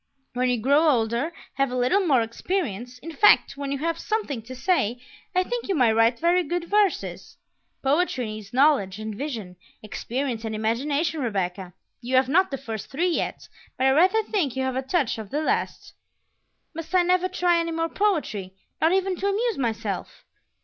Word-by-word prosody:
When 250 +1 +1
you 250 - +1
grow 285 +7 +4
older, 235 +4 +1 0.3
have 275 -1 +2
a 250 - -3
little 250 +11 +3
more 260 -6 +4
experience, 245 - -3
in 330 - -6
fact, 415 +6 +5
when 280 -1 -4
you 280 - -1
have 330 +3 -2
something 420 - -2
to 250 +4 -10
say, 255 - 0 0.4
I 365 - +4
think 485 +4 -4
you 390 - 0
may 245 -6 +4
write 225 +2 +3
very 345 +4 +3
good 345 +1 -2
verses. 410 -2 0 0.5
Poetry 275 -2 +1
needs 215 -1 -7
knowledge 255 -8 +3
and 215 0 -5
vision, 215 -8 -5 0.3
experience 235 +2 -3
and 220 -1 -3
imagination, 280 +8 -1
Rebecca. 190 -5 -3 0.3
You 255 +2 -2
have 260 0 +4
not 370 +6 +4
the 275 - -3
first 225 -5 -6
three 340 +7 0
yet, - - -3 0.3
but 260 - +1
I 265 - +5
rather 370 +10 +4
think 365 - -1
you 265 - -1
have 260 -1 -1
a 260 - 0
touch 265 - 0
of 215 -3 -7
the 300 +6 -1
last." - - -2 0.8
"Must 330 +3 -5
I 360 - +5
never 365 +1 +2
try 355 -2 +2
any 335 0 -1
more 330 0 -1
poetry, 295 - -1 0.3
not 320 +3 +4
even 380 0 +1
to 395 - -1
amuse 435 0 0
myself?" 230 -3 -3
275 Hz, 185 wpm, -25 LUFS, 230-345 Hz, 0.8 s, fact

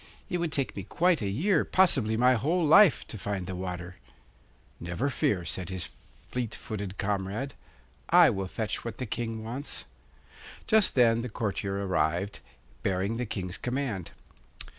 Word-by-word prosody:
It 180 - 0
would 170 -2 -1
take 140 -2 -1
me 100 - -4
quite 175 - +2
a 100 - -1
year, 160 - +2
possibly 130 - +3
my 125 +2 +5
whole 160 - +1
life, 160 - +6
to 110 - -8
find 95 -2 -3
the 95 - -5
water.' 90 0 -5 0.8
'Never 85 +12 -2
fear,' 95 -7 0
said 90 +2 -4
his 95 -3 -3 0.4
fleet 120 -3 -2
footed 100 -2 -5
comrade, 100 +6 -2 0.6
'I - - +7
will 95 -1 -3
fetch 110 +3 -3
what 115 -1 -5
the 130 - -3
King 115 -1 -4
wants.' 125 +6 -5 0.8
Just 220 -2 +4
then 115 -2 +5
the 125 - -4
courtier 100 -2 -2
arrived, 90 +2 0 0.4
bearing 95 +4 0
the 125 -1 -2
King's 90 -3 -4
command. 125 -8 -2
110 Hz, 155 wpm, -29 LUFS, 95-130 Hz, 0.8 s, I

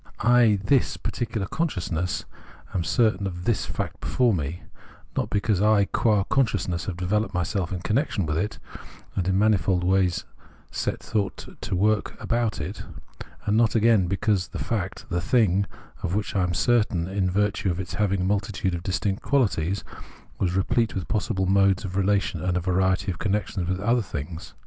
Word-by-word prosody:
I, 120 -2 +5
this 135 +3 +2
particular 115 -4 -3
conscious 140 - -2
I, 90 +3 -5
am 90 - +1
certain 100 0 +2
of 90 -2 -6
this 115 +1 0
fact - - -4
before 125 -3 +2
me, 80 0 -3 0.5
not - - -1
because 100 -1 +1
I 105 -1 +4
qua 105 -1 +2
consciousness 105 -8 0
have 90 -4 -4
developed 100 +3 0
myself 90 0 -1
in 90 -2 -3
connection 110 - 0
with 75 0 -1
it 105 +7 -1 0.6
and 90 - -1
in 95 0 +2
manifold 100 -3 +3
ways 95 -1 +2 0.5
set - - -2
thought 100 -3 -3
to - - -2
work 105 +3 +1
about 115 -2 0
it: 75 - -5 0.6
and 105 - +2
not, 115 -1 +3
again, 110 -4 +4
be 100 +2 -1
cause 100 -2 +1
the - - -7
fact, - - -3
the 85 0 0
thing, 100 -4 +2 0.3
of 90 - -1
which 105 0 -2
I 95 - +3
am 90 -1 0
certain, 105 -6 +2
in 95 -1 0
virtue 105 +1 +1
of 85 0 -2
its 95 0 -5
having 100 -2 +1
a - - 0
multitude 100 -1 0
of 85 - -3
distinct 95 +2 -1
quahties, 100 - +1 0.6
was 90 -2 +1
replete 115 +4 +1
with 95 -3 -3
possible 95 -3 0
modes 95 +1 +3
of 90 -1 -5
relation 100 -3 +1
and 90 0 0
a - - +2
variety 95 +2 +1
of 90 - -7
connections 100 -3 -1
with 95 0 -1
other 115 +5 +2
things. 80 -3 -6
95 Hz, 180 wpm, -25 LUFS, 90-110 Hz, 0.6 s, I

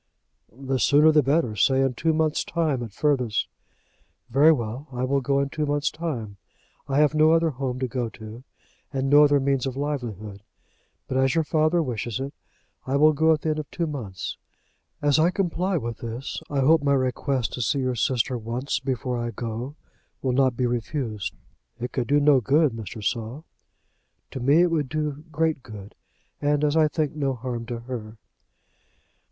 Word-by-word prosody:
"The 135 +3 -3
sooner 150 +6 +5
the 155 -1 +5
better; 140 -4 +1
say 135 +6 +3
in 135 -1 +1
two 160 +6 +1
months' 155 -1 +1
time 155 -7 -1
at 115 -3 -6
furthest." 125 -2 0 0.8
"Very 145 +6 +6
well. 125 0 -2
I 125 0 -3
will 135 +2 +1
go 140 +2 +1
in 140 0 0
two 150 +1 -2
months' 145 +2 0
time. 120 -12 -5 0.5
I 135 - 0
have 150 0 +4
no 155 +1 +5
other 165 -1 +3
home 130 -1 -3
to 130 0 -1
go 120 -1 -2
to, 110 +3 -11 0.5
and 135 -1 -1
no 145 +1 +8
other 145 -1 +4
means 135 -1 0
of 130 0 -5
livelihood; 115 -9 -4 0.7
but 130 - -2
as 135 +3 +2
your 165 - +3
father 155 +2 +2
wishes 120 -3 -3
it, 135 +1 -4 0.5
I 135 - 0
will 155 +2 +5
go 160 +2 +3
at 155 -1 +2
the 160 - -1
end 155 0 0
of 150 - -6
two 170 - -2
months. 120 - -5 0.7
As 145 0 +4
I 165 +2 +5
comply 185 0 0
with 120 -5 -4
this, 115 +3 -5
I 140 -2 0
hope 160 +4 +5
my 140 -1 +2
request 130 -1 -1
to 125 - -4
see 120 +5 +1
your 130 -1 0
sister 125 +2 0
once 120 +5 -2
before 125 -2 -2
I 120 0 -2
go 120 +4 -5 0.5
will 130 - +1
not 130 -2 +2
be 125 - +1
refused." 120 - -3 0.4
"It 125 +1 -4
could 125 -3 -2
do 145 +1 +4
no 145 -2 +5
good, 145 +5 +3
Mr. 110 -1 -7
Saul." 120 +7 -3 0.9
"To - - -5
me 140 +7 +4
it 175 - +2
would 150 -5 0
do 150 -1 -3
great 160 -2 0
good, 105 -4 -11 0.5
and, 145 0 +1
as 150 0 +2
I 160 -1 +5
think, 150 -1 -2
no 140 -3 -1
harm 120 -1 -5
to 120 -1 -5
her." 115 -3 -7
135 Hz, 190 wpm, -25 LUFS, 120-150 Hz, 0.9 s, no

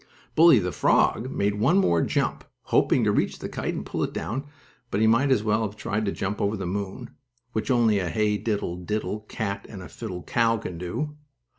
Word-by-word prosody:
Bully, 165 -3 +7
the 90 -3 0
frog, 120 +7 +2
made 105 -4 -1
one 140 - +4
more 85 - +3
jump, - - 0 0.2
hoping - - +3
to - - +3
reach - - 0
the - - -5
kite, - - -3
and - - -5
pull - - -3
it - - -1
down, 120 - -3 0.4
but 100 - -1
he 110 - +4
might 115 +5 +4
as 130 -6 +3
well 110 0 +1
have 105 -2 -3
tried 105 0 -2
to 100 - 0
jump 100 +1 -3
over 100 +2 0
the 95 - -4
moon, 100 +5 -4 0.4
which 110 +2 -3
only 115 -5 +3
a 90 -3 -2
hey 105 +4 +1
diddle 100 -4 -2
diddle 105 +3 -3
cat 100 -2 -3
and 95 -4 -8
the - - -8
fiddle 90 -7 -6
cow 115 -1 +2
can 90 -5 -6
do. 150 - -4
105 Hz, 210 wpm, -25 LUFS, 100-115 Hz, 0.4 s, Bully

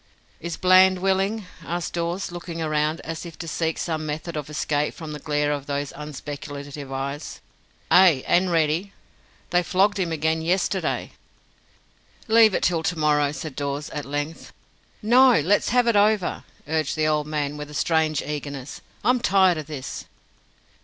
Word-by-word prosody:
"Is 170 0 -5
Bland 185 0 +6
willing?" 195 +3 0 0.2
asked 175 0 -4
Dawes, 175 +3 -2
looking 175 -1 -7
round, 155 0 0
as 165 -1 -6
if 170 -2 -10
to 165 - -7
seek 160 0 -1
some 160 -2 -2
method 155 +2 -5
of 150 -1 -5
escape 150 0 -1
from 160 -3 -7
the 150 - -6
glare 150 -1 0
of 145 -1 -3
those 145 0 -3
unspeculative 145 -1 -7
eyes. 140 +3 -5 0.5
"Ay, 175 -8 +6
and 180 +1 +2
ready. 165 +4 +1 0.6
They 175 0 +4
flogged 195 +3 +2
him 175 -3 -1
again 160 +1 0
yesterday." 180 +4 -1 1.2
"Leave 220 -2 +6
it - - -1
till 170 -3 +2
to 165 +1 -1
morrow," 150 -2 +2
said 155 -2 -7
Dawes, 140 +1 -3
at 150 -1 -5
length. 145 +3 -5 0.5
"No; 245 +1 +6
let's 190 +8 +2
have 245 0 +3
it 235 -2 +2
over," 205 -2 +2 0.2
urged 155 -2 -1
the 155 -1 +1
old 150 -1 +1
man, 150 -1 -2
with 150 0 -7
a 150 - -10
strange 155 -1 +1
eagerness. 145 -2 -6 0.2
"I'm 250 0 +3
tired 190 -6 +3
o' - - -2
this." 145 -3 -7
160 Hz, 160 wpm, -24 LUFS, 150-180 Hz, 1.2 s, Bland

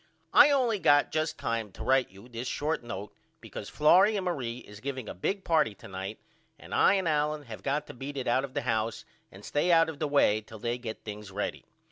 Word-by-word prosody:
I 290 0 +9
only 250 -7 +2
got 145 -4 +4
just 155 0 -1
time 115 -3 -2
to - - -8
write 130 0 +3
you 100 +5 -15
this 120 0 -6
short 155 +4 -1
note 105 -3 -7 0.3
because - - -8
Florrie 185 +8 +5
and 190 - -3
Marie 125 -9 -2
is 105 -4 -12
giving 130 -2 -5
a - - -5
big 190 - -2
party 155 - +2
to - - -13
night 95 +2 -6 0.4
and - - -11
I 200 - +5
and 190 -3 0
Allen 150 -1 0
have 115 -5 -9
got 145 +2 -1
to - - -10
beat 140 +3 -7
it 130 - -3
out 125 +3 +2
of 135 -1 -7
the - - -1
house 110 0 -1 0.3
and 95 +2 -13
stay 150 +5 +1
out 165 -1 +5
of 150 -3 -7
the 155 - 0
way 125 -7 +3
till 110 +1 -12
they 120 +3 -2
get 115 -3 -7
things 105 -1 -7
ready. 100 +2 -4
130 Hz, 230 wpm, -29 LUFS, 110-155 Hz, 0.4 s, I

